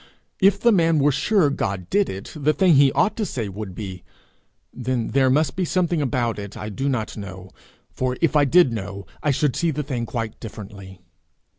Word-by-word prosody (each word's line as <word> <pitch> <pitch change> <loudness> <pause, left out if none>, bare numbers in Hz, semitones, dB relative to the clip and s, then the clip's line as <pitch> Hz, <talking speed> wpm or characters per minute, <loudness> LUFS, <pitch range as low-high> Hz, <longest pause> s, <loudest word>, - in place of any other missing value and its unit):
If 195 0 +4
the 235 +2 +4
man 165 -5 +3
were 145 0 +3
sure 175 +1 +2
God 100 -8 -3
did 205 -1 +2
it, 95 +2 -7
the 155 0 +1
thing 185 -1 +4
he 140 -1 +6
ought 210 - +2
to 220 - -1
say 120 - -3
would 100 -1 -7
be, 95 -4 -7 0.7
'Then 125 -2 -2
there 135 -1 +3
must 145 +2 +2
be 185 - -1
something 175 -2 0
about 120 -5 -1
it 100 0 -8
I 105 - -5
do 135 +7 -2
not 115 -5 -2
know, 95 -2 -8 0.5
which 130 0 0
if 165 -3 +1
I 145 -1 +5
did 160 -3 +4
know, 100 -2 -6 0.2
I 150 - 0
should 140 -2 +1
see 165 +5 +1
the 150 -1 -2
thing 125 -4 -3
quite 115 -2 -4
differently.' 100 -4 -10
130 Hz, 200 wpm, -22 LUFS, 105-155 Hz, 0.7 s, he